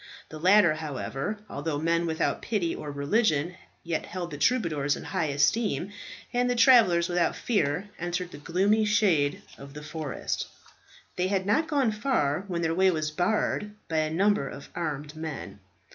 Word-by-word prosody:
The 155 Hz, -, -8 dB
latter, 185 Hz, -1 st, +5 dB
however, 155 Hz, +4 st, -4 dB
although 145 Hz, +1 st, -3 dB
men 165 Hz, +2 st, +1 dB
without 160 Hz, -1 st, -1 dB
pity 195 Hz, -7 st, -1 dB
or 150 Hz, -, -6 dB
religion, 155 Hz, +2 st, +1 dB, 0.3 s
yet 165 Hz, -2 st, -3 dB
held 175 Hz, -2 st, -5 dB
the 145 Hz, -, -5 dB
troubadours 155 Hz, -, +1 dB
in -, -, -8 dB
high 160 Hz, -, -1 dB
esteem, 175 Hz, +7 st, +1 dB, 0.4 s
and 245 Hz, 0 st, +2 dB
the 245 Hz, -, +1 dB
travellers 230 Hz, -9 st, +6 dB
without 175 Hz, -1 st, +1 dB
fear 190 Hz, -4 st, 0 dB
entered 175 Hz, +1 st, -3 dB
the 145 Hz, -, -10 dB
gloomy 195 Hz, +8 st, +2 dB
shades 200 Hz, -9 st, +2 dB, 0.2 s
of 140 Hz, +1 st, -11 dB
the 150 Hz, -, -8 dB
forest. 155 Hz, -4 st, -4 dB, 0.7 s
They 180 Hz, +1 st, +1 dB
had 190 Hz, -1 st, 0 dB
not 220 Hz, +11 st, +2 dB
gone 275 Hz, -6 st, +2 dB
far 200 Hz, -, 0 dB
when 170 Hz, -3 st, -2 dB
their 165 Hz, 0 st, +1 dB
way 190 Hz, +2 st, +4 dB
was 155 Hz, -3 st, -1 dB
barred 210 Hz, +4 st, 0 dB
by 160 Hz, -, -2 dB
a 155 Hz, 0 st, +1 dB
number 190 Hz, -2 st, +2 dB
of 140 Hz, -, -10 dB
armed 150 Hz, -3 st, -4 dB
men. 155 Hz, -11 st, -6 dB
170 Hz, 165 wpm, -27 LUFS, 150-205 Hz, 0.7 s, travellers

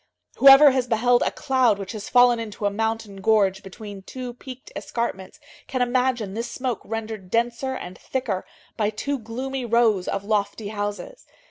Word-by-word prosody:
Whoever 275 Hz, +1 st, +9 dB
has 255 Hz, -1 st, 0 dB
beheld 240 Hz, +1 st, +3 dB
a -, -, +2 dB
cloud 260 Hz, -6 st, +1 dB
which 195 Hz, -2 st, -6 dB
has 215 Hz, -2 st, -7 dB
fallen 245 Hz, -1 st, +5 dB
into 215 Hz, -2 st, -5 dB
a 205 Hz, -, +2 dB
mountain 220 Hz, -1 st, -3 dB
gorge 195 Hz, -2 st, +2 dB
between 200 Hz, +1 st, -10 dB
two 250 Hz, +4 st, -7 dB
peaked 255 Hz, +1 st, -11 dB
escarpments 195 Hz, -5 st, -4 dB, 0.3 s
can 255 Hz, -2 st, 0 dB
imagine 245 Hz, -4 st, 0 dB
this 230 Hz, +3 st, -4 dB
smoke 255 Hz, -4 st, -3 dB
rendered 220 Hz, -3 st, -6 dB
denser 240 Hz, +4 st, -1 dB
and 180 Hz, -6 st, -8 dB
thicker 240 Hz, -8 st, -3 dB, 0.3 s
by 210 Hz, -2 st, +1 dB
two 275 Hz, +6 st, -3 dB
gloomy 255 Hz, +4 st, -5 dB
rows 230 Hz, -5 st, +2 dB
of 195 Hz, -, -2 dB
lofty 205 Hz, 0 st, -1 dB
houses. 205 Hz, -, -5 dB
225 Hz, 160 wpm, -24 LUFS, 205-250 Hz, 0.3 s, Whoever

